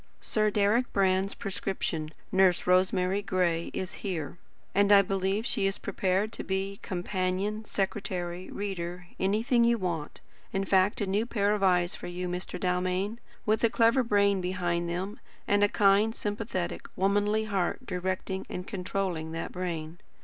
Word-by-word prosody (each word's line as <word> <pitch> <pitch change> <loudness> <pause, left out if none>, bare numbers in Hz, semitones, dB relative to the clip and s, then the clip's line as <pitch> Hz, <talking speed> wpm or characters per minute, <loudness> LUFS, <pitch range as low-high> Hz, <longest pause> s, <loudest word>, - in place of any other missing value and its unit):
Sir 215 -1 +1
Deryck 210 +4 +2
Brand's 190 0 +2
prescription, 185 -5 -3 0.2
Nurse 190 -2 +4
Rosemary 185 +1 +3
Gray, 180 -4 0
is 185 0 -4
here; 175 -5 -4 0.3
and 200 +1 +4
I 200 -1 +8
believe 195 +3 0
she 195 - +1
is 195 - -1
prepared 195 +2 0
to - - -4
be 195 +1 -2
companion, 185 +3 -2
secretary, 185 -3 -3
reader, 180 -3 -4
anything 225 +6 +2
you 235 0 +4
want, 170 -7 -3 0.3
in 195 0 -1
fact 190 +2 +3
a - - +2
new 205 +4 0
pair 205 -3 +1
of 210 - -1
eyes 180 -2 +3
for - - -7
you, 180 +1 -4
Mr. 180 +1 -4
Dalmain, 185 +4 0 0.3
with 220 +1 +1
a 230 - +5
clever 230 +3 +4
brain 200 -4 +3
behind 175 -2 -1
them, 185 +5 -3 0.3
and 205 0 +3
a 205 - +5
kind, 205 +3 +4
sympathetic, 205 -4 -3
womanly 205 +3 +2
heart 200 +4 -1
directing 185 0 -3
and 180 - -5
controlling 180 -4 -3
that 165 - -4
brain. 170 -2 -4
190 Hz, 150 wpm, -29 LUFS, 180-205 Hz, 0.3 s, I